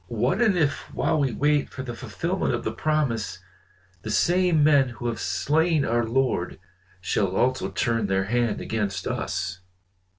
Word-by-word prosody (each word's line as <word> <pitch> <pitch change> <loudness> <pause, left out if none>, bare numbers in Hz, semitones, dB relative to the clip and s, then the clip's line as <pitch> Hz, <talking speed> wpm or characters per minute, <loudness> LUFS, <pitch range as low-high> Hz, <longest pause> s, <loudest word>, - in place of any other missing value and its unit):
"What - - 0
and 215 -6 +3
if 145 -4 -1
while - - +1
we 135 -3 +1
wait 145 +5 +1
for 130 - -7
the 120 -2 -5
fulfilment - - -2
of - - -5
the - - -2
promise, 120 - -1 0.6
the 110 - -6
same 170 - +3
men 140 -3 +5
who 120 0 -9
have 115 -2 -2
slain 150 - +1
our 120 0 +1
Lord 125 -7 0 0.4
shall 95 0 0
also 130 +4 +1
turn 115 -3 0
their 95 0 +1
hand 115 +1 0
against 100 -4 -2
us? 90 -1 -3
120 Hz, 160 wpm, -25 LUFS, 100-145 Hz, 0.6 s, men